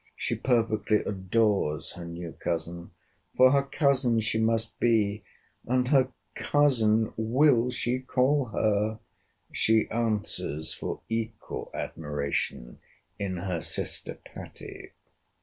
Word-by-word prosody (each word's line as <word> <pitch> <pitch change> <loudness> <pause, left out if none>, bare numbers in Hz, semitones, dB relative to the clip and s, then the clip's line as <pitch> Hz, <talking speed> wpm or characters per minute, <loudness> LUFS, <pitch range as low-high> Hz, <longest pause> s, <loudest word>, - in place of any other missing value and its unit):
She - - -2
perfectly 110 -4 +1
adores 95 -5 0
her 85 - -8
new 85 0 -6
cousin—'For 85 +9 0
her 140 0 +4
cousin 135 -4 +2
she 110 0 0
must 115 0 0
be. 105 -3 +2 0.5
And 125 +1 +1
her 130 -2 +4 0.2
cousin 115 -4 +2
will 125 +2 +3
she 125 0 -1
call 130 +2 +2
her! 110 -1 0 0.5
She 110 0 +3
answers 105 -9 -1
for - - -5
equal 115 -1 -4
admiration 70 -5 -3 0.4
in 95 -2 -2
her 85 -2 -2
sister - - -3
Patty. - - -10
110 Hz, 105 wpm, -28 LUFS, 95-125 Hz, 0.5 s, her